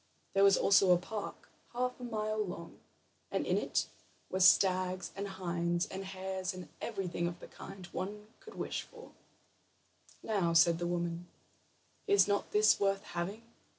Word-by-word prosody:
There 195 - +4
was 200 -1 +6
also 195 -1 +5
a - - +4
park, 205 +4 -6 0.3
half 250 +1 -1
a - - -9
mile 215 -2 -1
long, 175 -3 -8 0.5
and - - -1
in - - +1
it - - 0 0.5
were 190 - -1
stags 185 -1 +4
and 200 +1 -3
hinds, 175 -2 -1
and 190 +1 -6
hares, 190 0 -4
and 180 -1 -9
everything 185 -6 -2
of 170 0 -6
the - - -10
kind 195 -2 -10
one 210 +2 -5
could 440 -3 -13
wish - - -3
for. 475 -1 -13 1.1
"Now," 190 -6 +1
said 165 0 +5
the 175 - -1
woman, 175 0 -2 0.8
"is 405 0 +5
not 200 0 0
this 210 +1 +4
worth 195 -1 +1
having?" 175 +6 -4
190 Hz, 155 wpm, -33 LUFS, 175-210 Hz, 1.1 s, was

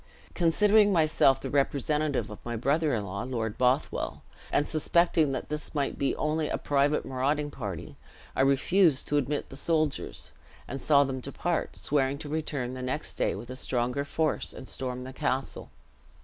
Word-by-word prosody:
Considering 205 +5 +4
myself 155 -6 +4
the - - -5
representative 145 +1 0
of - - -10
my 120 0 -4
brother 145 +7 +1
in 105 -2 -2
law, 100 +1 -4
Lord 115 -4 -3
Bothwell, 130 +3 0 0.3
and 145 - +2
suspecting 160 -1 +2
that - - -4
this 150 +1 -4
might 140 -2 -1
be 140 - +1
only 155 0 0
a - - -1
private 145 +1 +1
marauding 145 +3 -1
party, 95 - -6 0.4
I - - +2
refused 140 +3 +3
to 145 - +2
admit 145 +1 -1
the - - -9
soldiers; 155 0 -1 0.4
and 135 +1 -5
saw 145 -2 +5
them 130 -1 -3
depart, 155 +6 -2
swearing 140 -1 +1
to 145 0 -7
return 145 -5 -2
next 130 +3 -4
day - - 0
with 120 - -8
a - - -5
stronger 125 +1 -1
force, 155 +2 -1
and 130 - -9
storm 125 -1 -4
the 130 +1 -8
castle. 135 -2 -2
140 Hz, 165 wpm, -28 LUFS, 130-155 Hz, 0.4 s, saw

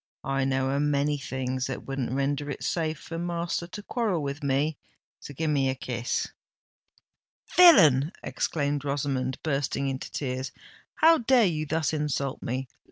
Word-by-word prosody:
I 135 -1 0
know 135 0 0
a 140 - 0
many 145 0 +1
things 130 -1 -3
that 135 - -5
wouldn't 135 -3 -3
render 140 +2 -1
it 140 - -5
safe 160 -2 -1
for 165 +3 -7
master 170 0 -2
to 205 +4 -8
quarrel 210 -9 -1
with 140 +2 -4
me. 140 +2 0 0.4
So - - -9
give 155 +2 -1
me 135 -2 +2
a 130 - -1
kiss——" 120 -2 -2 1.3
"Villain!" 155 - +7
exclaimed 145 -2 -1
Rosamond, 135 -2 -1
bursting 140 -2 -1
into 130 0 -5
tears: 130 -1 -3 0.4
"how 325 0 +6
dare 245 -1 +4
you 155 -4 -1
thus 160 0 0
insult 145 -3 -2
me? 130 +2 -3
140 Hz, 155 wpm, -27 LUFS, 135-160 Hz, 1.3 s, Villain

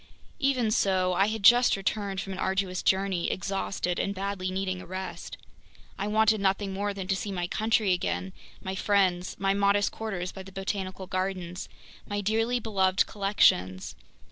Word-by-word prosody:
Even 255 -5 +1
so, 185 -3 +2
I 195 +3 +3
had 220 -1 -3
just 240 +1 +6
returned 195 0 -2
from 195 - -6
an 185 - -7
arduous 190 -1 -1
journey, 190 -2 +1
exhausted 195 -1 -2
and 200 0 -1
badly 195 -1 -3
needing 185 -1 -2
a - - -11
rest. 185 +1 -6 0.6
I 200 - -3
wanted 215 0 +3
nothing 195 0 0
more 205 +1 -1
than 195 -2 -6
to 195 - +1
see 200 +1 -4
my 175 -2 -2
country 215 0 +1
again, 90 - -2 0.3
my 190 - -3
friends, 190 -2 +1
my 195 0 +1
modest 200 0 +2
quarters 195 -5 -4
by 190 - -9
the 190 0 -11
Botanical 190 0 -4
Gardens, 185 -1 -3 0.4
my 205 0 -2
dearly 225 +4 +1
beloved 195 -4 +2
collections! 95 - +1
195 Hz, 165 wpm, -28 LUFS, 185-205 Hz, 0.6 s, just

